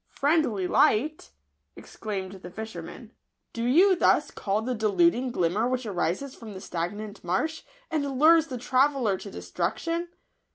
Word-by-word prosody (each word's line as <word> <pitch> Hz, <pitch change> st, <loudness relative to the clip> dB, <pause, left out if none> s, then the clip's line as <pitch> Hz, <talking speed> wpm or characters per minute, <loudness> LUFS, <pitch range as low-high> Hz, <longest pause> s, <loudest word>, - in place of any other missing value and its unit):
" -, -, -46 dB
Friendly 280 Hz, -, +1 dB
light 290 Hz, -, +2 dB, 0.2 s
!" 70 Hz, -1 st, -50 dB
exclaimed 195 Hz, -3 st, -6 dB
the 180 Hz, -, -8 dB
fisherman; 220 Hz, +2 st, -8 dB, 0.2 s
" -, -, -53 dB
do 230 Hz, -, -3 dB
you 355 Hz, +11 st, +5 dB
thus -, -, +3 dB
call 205 Hz, +2 st, -2 dB
the 255 Hz, +2 st, -1 dB
deluding 250 Hz, +5 st, +2 dB
glimmer 200 Hz, +3 st, +1 dB
which 255 Hz, -1 st, -2 dB
arises 200 Hz, +6 st, -2 dB
from 220 Hz, -3 st, -10 dB
the -, -, -6 dB
stagnant 200 Hz, +5 st, -5 dB
marsh, 295 Hz, -, -1 dB, 0.3 s
and 285 Hz, -4 st, -1 dB
lures 320 Hz, +2 st, +6 dB
the 255 Hz, -4 st, -5 dB
traveller 255 Hz, -3 st, +2 dB
to -, -, -8 dB
destruction 325 Hz, -, -3 dB
230 Hz, 155 wpm, -27 LUFS, 195-285 Hz, 0.3 s, lures